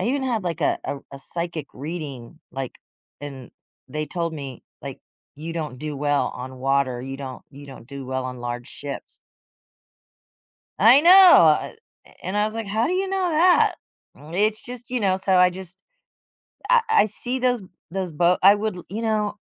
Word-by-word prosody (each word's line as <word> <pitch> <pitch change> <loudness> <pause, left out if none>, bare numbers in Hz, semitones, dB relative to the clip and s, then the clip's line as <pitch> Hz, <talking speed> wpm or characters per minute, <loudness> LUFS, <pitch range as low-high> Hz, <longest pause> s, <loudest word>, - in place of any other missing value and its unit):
I - - -1
even 270 +4 0
had, 235 -7 -1
like, 170 -1 -3
a - - +1
a - - -3
r 140 - -10
a 140 - -8
psychic 170 0 -5
reading, 140 -4 -7
like, 135 -2 -6 0.4
and 135 -4 -8 0.4
they 150 +2 -3
told 170 +1 -3
me, 135 -5 -7 0.2
like, - - -8 0.3
"You 160 +3 -7
don't 155 -6 -4
do 150 -1 -5
well 145 0 +1
on 130 +1 -8
water, 135 -2 0
you 135 +1 -6
don't 135 -2 -8
you 140 0 -12
don't 130 -4 -12
do 140 0 -8
well 130 0 -3
on 125 -1 -6
large 120 0 -5
ships." 140 -1 -8 1.6
I 235 +7 +7
know! 340 +4 +5
Uh, 380 -2 +7 0.3
eh, - - -19
and 190 +3 -3
I 210 - +3
was 215 +1 -3
like, 225 -2 -4
"How 220 +4 0
do 350 - -1
you 380 +1 0
know 380 -2 0
that?" 345 +3 +4 0.6
It's 210 +3 0
just, 245 0 -9
you 250 - -1
know, 190 -2 +2
so 190 0 +1
I 180 0 +6
just 185 0 -10 0.9
I - - +6
I 445 - +5
see 245 +5 -4
those 250 -2 +1 0.3
those 190 -2 -3
boat 175 +3 +3
I 200 +2 +8
would 215 -1 -2
l 175 - -9
you 215 +5 -4
know, 215 -2 -1
175 Hz, 190 wpm, -23 LUFS, 140-220 Hz, 1.6 s, I